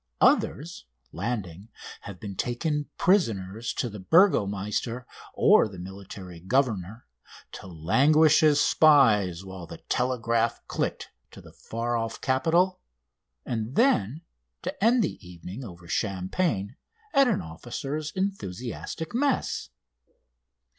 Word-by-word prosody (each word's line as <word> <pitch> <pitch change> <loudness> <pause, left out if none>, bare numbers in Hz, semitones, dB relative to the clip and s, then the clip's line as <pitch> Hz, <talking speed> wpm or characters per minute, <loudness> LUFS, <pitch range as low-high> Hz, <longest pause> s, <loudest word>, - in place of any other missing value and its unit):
Others, 160 - +2 0.3
landing, 100 -1 -4 0.3
have 100 -3 -9
been 100 -2 -7
taken 145 - -2
prisoners 115 - +1
to - - -2
the 105 -2 -8
burgomeister 110 - +2 0.3
or - - +5
the 100 -3 -11
military 95 -1 -9
governor, 110 -1 -1 0.5
to - - -9
languish 140 - +4
as 150 -2 +5
spies 105 - +4
while 95 -3 -9
the - - -9
telegraph 115 -2 0
clicked - - -3 0.2
to - - -13
the - - -15
far 120 +1 -3
off 115 0 -4
capital, 165 +8 +2 0.7
and 115 +2 -3
then 155 - +2 0.4
to - - -4
end 235 +1 +4
the 170 - -3
evening 90 +6 -9
over 85 -6 -11
champagne 100 - -1 0.4
at 275 -2 +5
an 220 -6 0
officers' 135 - -5
enthusiastic 160 - -4
mess. 260 - 0
115 Hz, 115 wpm, -26 LUFS, 95-150 Hz, 0.7 s, or